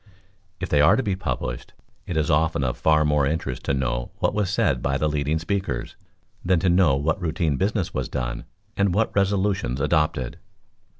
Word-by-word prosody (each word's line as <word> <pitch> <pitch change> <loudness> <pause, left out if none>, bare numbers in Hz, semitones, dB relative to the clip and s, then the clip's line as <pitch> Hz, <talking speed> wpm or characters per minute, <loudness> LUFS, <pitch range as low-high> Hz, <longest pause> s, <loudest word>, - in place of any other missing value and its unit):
If - - -4
they 75 - +3
are 75 - +6
to 130 - 0
be 100 -4 0
published, 95 - -4 0.3
it 85 - -2
is 75 -2 +1
often 80 -1 +2
of 60 -2 -1
far 75 -1 +3
more 75 -2 +2
interest 70 -4 -3
to - - +1
know 65 -2 -2
what - - 0
was 105 -3 0
said 70 -9 +1
by 70 0 0
the 75 - 0
leading 75 +1 0
speakers, 85 -6 -3 0.5
than 90 -1 +2
to 95 - +2
know 90 -5 +4
what 80 +6 -1
routine 80 -3 0
business 95 - -1
was 65 0 -2
done, - - -4 0.3
and 100 -2 +1
what 110 +2 0
resolutions 95 -9 +1
adopted. 75 -3 0
80 Hz, 185 wpm, -24 LUFS, 70-95 Hz, 0.5 s, are